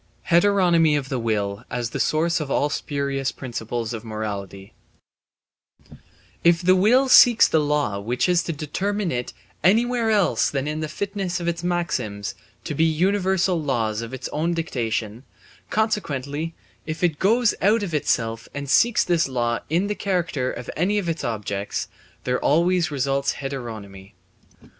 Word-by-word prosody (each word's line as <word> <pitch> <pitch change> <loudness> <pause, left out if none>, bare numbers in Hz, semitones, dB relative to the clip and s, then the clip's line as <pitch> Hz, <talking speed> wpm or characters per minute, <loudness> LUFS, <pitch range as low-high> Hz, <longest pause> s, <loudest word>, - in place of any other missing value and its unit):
Heteronomy 170 -4 +4
of 135 -2 -4
the 130 - -2
Will 105 -2 -2
as 120 -2 -3
the - - -4
Source 170 +2 +1
of 150 -3 -4
all 145 +1 +1
spurious 140 -2 -2
Principles 120 -2 -4
of 110 -1 -6
Morality 100 -3 -6 1.7
If 170 +1 +4
the 185 +1 +5
will 240 +8 +4
seeks 240 -3 +7
the 160 - +2
law 145 -9 0
which 120 - -1
is 180 -1 +3
to - - -2
determine 185 +6 -2
it 125 0 -3 0.3
anywhere 230 +5 +3
else 210 -4 +2
than 135 0 -2
in 150 +1 -3
the 155 - -2
fitness 195 +1 -3
of 170 - -4
its 170 0 -2
maxims 130 - -2 0.3
to - - -4
be 155 - +1
universal 185 +2 +1
laws 115 -6 -1
of 115 0 -7
its 130 - -5
own 165 +3 -1
dictation, 115 -7 -3 0.5
consequently 165 - -2 0.3
if 155 +2 -4
it 160 -4 +1
goes 230 +4 +3
out 210 +3 +3
of 180 -5 -4
itself 115 -6 -1
and 140 -1 -4
seeks 230 - +4
this 170 -5 +1
law 120 -2 0
in 170 +5 +1
the 205 - -1
character 170 -11 -1
of 120 - -8
any 190 +6 +1
of 190 -5 -1
its 165 -1 -3
objects, 100 -3 -3 0.4
there 125 0 0
always 170 +3 +2
results 140 -1 0
heteronomy. 110 -8 -7
150 Hz, 155 wpm, -23 LUFS, 120-180 Hz, 1.7 s, seeks